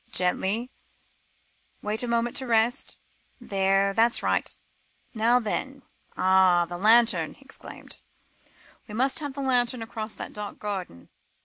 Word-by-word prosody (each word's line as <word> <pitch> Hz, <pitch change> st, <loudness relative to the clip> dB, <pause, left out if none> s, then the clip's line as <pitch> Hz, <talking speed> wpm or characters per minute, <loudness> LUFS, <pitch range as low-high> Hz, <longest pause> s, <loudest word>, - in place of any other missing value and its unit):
"Gently 195 Hz, +7 st, 0 dB, 1.1 s
wait 210 Hz, +1 st, 0 dB
a 245 Hz, -, -1 dB
moment 235 Hz, 0 st, 0 dB
to 265 Hz, -2 st, -4 dB
rest. 235 Hz, +3 st, +1 dB, 0.4 s
There 195 Hz, -3 st, +1 dB
that's 230 Hz, +3 st, +3 dB
right -, -, 0 dB, 0.6 s
now 235 Hz, +2 st, +3 dB
then. 265 Hz, +4 st, -3 dB, 0.3 s
Ah! 185 Hz, -2 st, +4 dB
the 175 Hz, +1 st, -7 dB
lantern," 230 Hz, +3 st, +4 dB
he -, -, -21 dB
exclaimed; -, -, -10 dB, 0.9 s
"we 210 Hz, -, -8 dB
must 265 Hz, +5 st, +1 dB
have 290 Hz, -3 st, -6 dB
the 280 Hz, -, -4 dB
lantern 245 Hz, -2 st, +1 dB
across 220 Hz, -1 st, -6 dB
that -, -, -8 dB
dark 210 Hz, -1 st, -6 dB
garden." 190 Hz, -, -6 dB
225 Hz, 130 wpm, -26 LUFS, 195-245 Hz, 1.1 s, Ah